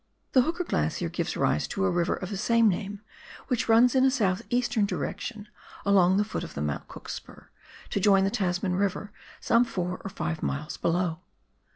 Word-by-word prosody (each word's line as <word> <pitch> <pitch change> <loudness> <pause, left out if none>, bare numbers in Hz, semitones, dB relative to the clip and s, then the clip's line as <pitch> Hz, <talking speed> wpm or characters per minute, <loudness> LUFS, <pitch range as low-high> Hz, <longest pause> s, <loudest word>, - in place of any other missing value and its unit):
Tlie 255 -2 +5
Hooker 340 +2 -1
Glacier - - -1
gives - - -3
rise - - +1
to 195 - -1
a 190 - +2
river 175 0 +1
of 185 +2 -6
the - - -2
same 230 +3 +3
name 200 +1 -2 0.5
which 245 -3 0
runs 230 +2 +6
in 260 -1 +4
a 265 - +6
south 205 -7 +1
eastern 240 -3 +1
direction 215 +1 -4 0.4
along 190 -2 +4
the 205 - +3
foot 215 - -4
of - - -9
the 70 - -3
Mount 75 -1 -3
Cook - - -11
spur - - -9 0.4
to - - 0
join 195 -1 +5
the 195 - +1
Tasman 180 -1 0
Eiver 200 +1 -1 0.3
some 230 +1 +4
four 180 -6 -3
or - - -4
five 170 -4 -3
miles 150 +3 -3
below. 170 -1 0
200 Hz, 195 wpm, -27 LUFS, 180-230 Hz, 0.5 s, runs